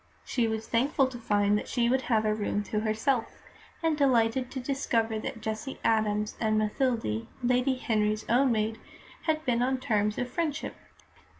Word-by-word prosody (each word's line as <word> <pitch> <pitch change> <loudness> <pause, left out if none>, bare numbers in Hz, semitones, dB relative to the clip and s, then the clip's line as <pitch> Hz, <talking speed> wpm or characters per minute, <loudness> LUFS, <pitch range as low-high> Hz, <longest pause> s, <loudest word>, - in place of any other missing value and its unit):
She 240 -3 +1
was 220 0 -3
thankful 270 +4 +2
to 245 -2 -8
find 205 -2 +2
that - - -8
she 235 -1 +1
would 260 +2 +2
have 220 -2 +3
a 215 - +2
room 205 -1 -1
to 210 +1 -2
herself, 225 +3 -1 0.4
and 325 -1 +2
delighted 250 -3 +2
to 265 - -5
discover 235 -4 0
that 225 - -5
Jessie 220 +5 -4
Adams 210 -1 +1
and 215 -1 +2
Mathilde, 215 - 0 0.2
Lady 250 +2 +2
Henry's 215 -3 0
own 255 +3 +4
maid, 220 0 0 0.5
had 310 0 +1
been 240 -2 +2
on 260 +1 +1
terms 210 -4 0
of 245 - -1
friendship. 310 +3 -2
230 Hz, 170 wpm, -28 LUFS, 215-260 Hz, 0.5 s, own